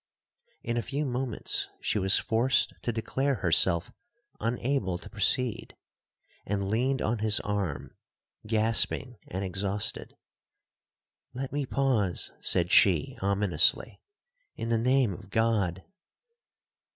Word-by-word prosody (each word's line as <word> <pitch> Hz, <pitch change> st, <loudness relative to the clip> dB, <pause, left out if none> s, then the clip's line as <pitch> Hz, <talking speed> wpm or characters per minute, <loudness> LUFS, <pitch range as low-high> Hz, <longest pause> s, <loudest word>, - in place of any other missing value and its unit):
'In 120 Hz, 0 st, -2 dB
a -, -, +1 dB
few 140 Hz, +6 st, -3 dB
moments, 125 Hz, -2 st, -2 dB
she 105 Hz, -, -1 dB
was 95 Hz, +1 st, +4 dB
forced 120 Hz, +4 st, +1 dB
to 120 Hz, -, -1 dB
declare 135 Hz, +5 st, -1 dB
herself 85 Hz, -2 st, +3 dB, 0.5 s
unable 115 Hz, -4 st, -1 dB
to -, -, -13 dB
proceed, 115 Hz, +2 st, 0 dB, 0.7 s
and 100 Hz, -1 st, -2 dB
leaned 130 Hz, +4 st, 0 dB
on 110 Hz, +1 st, -1 dB
his 110 Hz, -1 st, +3 dB
arm, 100 Hz, -8 st, -3 dB, 0.5 s
gasping 115 Hz, +2 st, +1 dB
and 95 Hz, +2 st, -4 dB
exhausted. 95 Hz, +2 st, -3 dB, 1.2 s
'Let 135 Hz, +1 st, -4 dB
me 145 Hz, -2 st, -2 dB
pause,' 125 Hz, -11 st, 0 dB
said 90 Hz, -1 st, +1 dB
she 85 Hz, -7 st, +4 dB
ominously, 100 Hz, -1 st, +2 dB, 0.5 s
'in 115 Hz, -, -5 dB
the 115 Hz, -1 st, +2 dB
name 125 Hz, -2 st, +2 dB
of 90 Hz, -, -12 dB
God!' 105 Hz, -5 st, 0 dB
110 Hz, 115 wpm, -28 LUFS, 95-125 Hz, 1.2 s, was